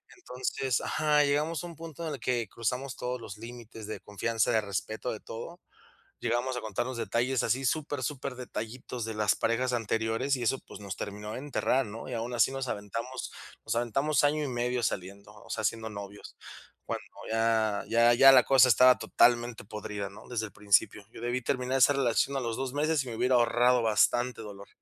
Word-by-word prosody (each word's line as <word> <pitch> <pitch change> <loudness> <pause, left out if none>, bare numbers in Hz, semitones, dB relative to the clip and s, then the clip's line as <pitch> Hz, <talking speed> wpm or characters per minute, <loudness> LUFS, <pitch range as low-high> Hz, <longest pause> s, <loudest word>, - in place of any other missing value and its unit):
Entonces 130 - -2
Ajá, 150 -1 +2
llegamos 150 +3 0
a - - -5
un 170 - -10
punto 165 0 -7
en 150 - -3
el - - -11
que 120 -3 -1
cruzamos 125 +3 -3
todos 125 0 -3
los 105 -2 -8
límites 115 -2 -9
de 110 - -5
confianza, 110 +2 0
de 110 - +3
respeto, 105 +4 -3
de 110 - -5
todo. 170 +10 -8 0.6
Llegamos 120 +2 0
a - - -2
contarnos 115 +4 -3
detalles 125 +2 0
así, 130 +2 0
super, 145 0 -1
superdetallitos 125 -3 -5
de 110 - -4
las 105 -1 +2
parejas 120 +2 0
anteriores 115 +3 0
y 125 - -5
eso, 130 +3 +1
pues, 100 - -12
nos 100 -2 -6
terminó 105 +1 -6
de - - -4
enterrar, 135 -2 0
¿no? 115 +4 -8
Y - - -3
aún 120 +2 -3
así 120 - +4
nos 135 -1 -3
aventamos 115 +6 -5 0.3
nos - - -1
aventamos 135 +6 +1
año 150 +1 +2
y - - -3
medio 120 0 -1
saliendo, 100 +1 -4
o 105 - -16
sea, 110 - -2
siendo 110 +1 -1
novios. 100 0 -9 0.5
Cuando - - -4 0.3
ya 110 -2 +1
ya 115 +1 +5
ya 135 +3 +9
la 130 -2 +8
cosa 130 -1 +6
estaba 125 +2 +6
totalmente 120 -2 +2
podrida, 105 -1 -5
¿no?, 100 - -14
desde 115 -3 -2
el - - -13
principio. 100 0 +2
Yo - - -10
debí 120 +1 -1
terminar 130 +1 0
esa 135 +3 +6
relación 135 +1 +1
a - - 0
los 115 -2 -2
2 135 -1 -3
meses 150 -1 +1
y - - -8
me 115 - -5
hubiera 125 +1 +3
ahorrado 120 +1 +4
bastante 115 +2 +2
dolor. 100 -1 -10
120 Hz, 195 wpm, -29 LUFS, 110-130 Hz, 0.6 s, ya